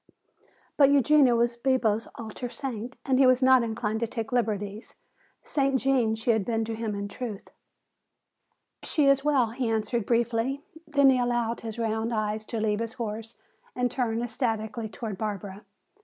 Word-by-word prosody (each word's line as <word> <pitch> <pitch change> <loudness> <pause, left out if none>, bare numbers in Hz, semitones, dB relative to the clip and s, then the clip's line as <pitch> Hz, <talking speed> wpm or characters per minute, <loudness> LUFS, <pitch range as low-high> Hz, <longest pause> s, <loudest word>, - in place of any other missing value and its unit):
But 280 -2 +6
Eugenia 280 -2 +5
was 235 0 +1
Bibo's 235 -3 +1
altar 230 +2 -6
saint 240 0 -5
and 265 -2 +2
he 265 - +6
was 255 +1 +4
not 260 -1 +6
inclined 220 -1 -2
to 230 - -1
take 225 -1 -5
liberties. 215 -3 -2 0.5
Saint 275 -2 +1
Gene 250 -5 +2
she 225 +2 +1
had 220 -3 +1
been 225 +1 -1
to 225 - -4
him 220 -2 -3
in 200 0 -4
truth! 210 -1 -7 1.3
"She 300 - +1
is 275 0 +4
well," 270 -6 +2
he 245 0 -2
answered 220 0 -1
briefly. 240 +4 0 0.2
Then 280 -3 +5
he 255 - +2
allowed 240 -1 0
his 225 -1 -6
round 225 0 -1
eyes 215 -1 -2
to 230 - -4
leave 210 -1 0
his 230 -1 -3
horse 225 -2 -6 0.4
and 250 -1 0
turn 235 -3 -1
ecstatically 225 -2 -2
toward 210 -3 -6
Barbara. 205 -2 -5
230 Hz, 165 wpm, -27 LUFS, 220-255 Hz, 1.3 s, But